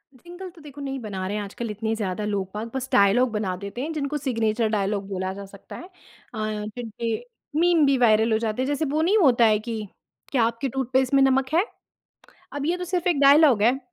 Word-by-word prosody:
Jingle 355 +6 -10
तो 335 -2 -17
देखो 290 -1 -11
नहीं 270 -1 -4
बना 195 -4 -5
रहे 205 +2 -3
हैं 205 - -3
आजकल 220 +3 -6
इतने 220 +1 -2
ज़्यादा 210 -1 -3
लोग-बाग 210 +2 -3
बस 265 0 -3
डायलॉग 225 +3 +4
बना 205 -4 -2
देते 200 +5 -6
हैं 315 +3 -3
जिनको 295 0 -2
सिग्नेचर 230 -4 0
डायलॉग 200 0 -1
बोला 190 -1 -3
जा 200 0 -8
सकता 195 0 -12
है 355 - -9
अ, - - -26 0.8
जिनके 225 0 -4 0.4
मीम 340 -3 +4
भी 275 -1 +3
वायरल 225 -1 +4
हो 220 - +3
जाते 225 +2 -2
हैं। 260 - -1
जैसे 290 +2 -1
वो 310 +1 +1
नहीं 390 +7 +3
होता 245 - +5
है 215 -1 +4
कि 220 -2 -5 0.4
"क्या 250 -5 +2
आपके 230 +4 -1
टूथपेस्ट 260 +1 0
में 275 - +5
नमक 265 0 +2
है?" 360 +6 +3 0.9
अब 285 0 -3
ये 350 +2 0
तो 360 - -5
सिर्फ़ 360 0 -1
एक 300 -5 +1
डायलॉग 280 -5 +6
है। 255 +4 +3
240 Hz, 215 wpm, -24 LUFS, 210-280 Hz, 0.9 s, डायलॉग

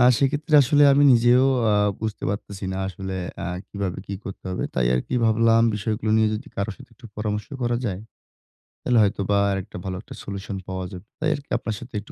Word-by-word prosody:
আ - - +6 0.2
সেক্ষেত্রে 145 +3 0
আসলে 145 +3 +4
আমি 140 +1 +4
নিজেও 120 +2 +5 0.3
আ - - +3 0.3
বুঝতে 110 -2 -4
পারতেছি 100 -1 -5
না 95 - -3
আসলে 95 0 -6 0.3
আ - - -3 0.2
কিভাবে 100 -3 -4
কি 100 - -4
করতে 95 - -8
হবে। 90 - -2
তাই 60 -2 +2
আরকি 60 - -2
ভাবলাম 115 +1 +4
বিষয়গুলো 110 +1 -2
নিয়ে 110 -1 +4
যদি 105 - -6
কারো 100 +2 -1
সাথে 135 - -15
একটু 125 - -13
পরামর্শ 105 0 -2 0.2
করা 120 0 +1
যায়, 95 -3 -3 0.8
তাহলে 125 - +2
হয়তোবা 100 0 +1
আরেকটা 95 0 -4
ভালো 95 -1 -3
একটা - - -11
solution 100 0 -6
পাওয়া 95 0 -4
যাবে। 95 +2 -10
তাই - - +1
আরকি 145 -1 -11
আপনার 110 - -4
সাথে 125 +1 -12
একটু 105 - -15
105 Hz, 200 wpm, -24 LUFS, 95-120 Hz, 0.8 s, আ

